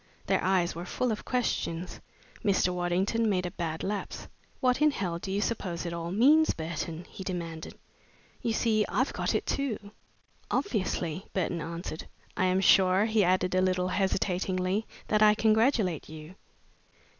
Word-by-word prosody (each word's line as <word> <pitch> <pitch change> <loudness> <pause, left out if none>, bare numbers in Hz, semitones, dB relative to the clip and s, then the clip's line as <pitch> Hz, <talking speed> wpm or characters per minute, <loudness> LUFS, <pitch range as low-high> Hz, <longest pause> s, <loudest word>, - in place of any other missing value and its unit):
Their - - +1
eyes 185 -2 +2
were 170 - -6
full 245 +6 -1
of 215 - -4
questions. 185 -8 -2 0.4
Mr. 190 -3 +2
Waddington 185 +6 +1
made 185 -3 0
a 175 - -3
bad 160 -2 -4
lapse. 205 0 -4 0.3
"What 250 +2 +2
in 305 - +6
hell 180 - -3
do 190 - -5
you 200 +1 0
suppose 185 -7 -2
it 170 - -3
all 170 0 -4
means, 285 - +4
Burton?" 165 +1 -5
he 195 - -9
demanded. 170 -3 -5 0.6
"You 230 - 0
see, 220 -1 +2
I've 260 - 0
got - - -1
it - - 0
too!" 220 -7 -2 0.6
"Obviously," 185 - -1
Burton 175 -2 -1
answered. 165 0 -6 0.3
"I 185 - +1
am 185 +1 +2
sure," 190 +1 +5
he 220 -2 +2
added, 185 0 +2
a 185 - +3
little 185 -1 +1
hesitatingly, 185 +1 0 0.2
"that 215 0 +2
I 210 0 +7
congratulate 220 - +2
you." 155 +2 -10
185 Hz, 155 wpm, -29 LUFS, 175-215 Hz, 0.6 s, I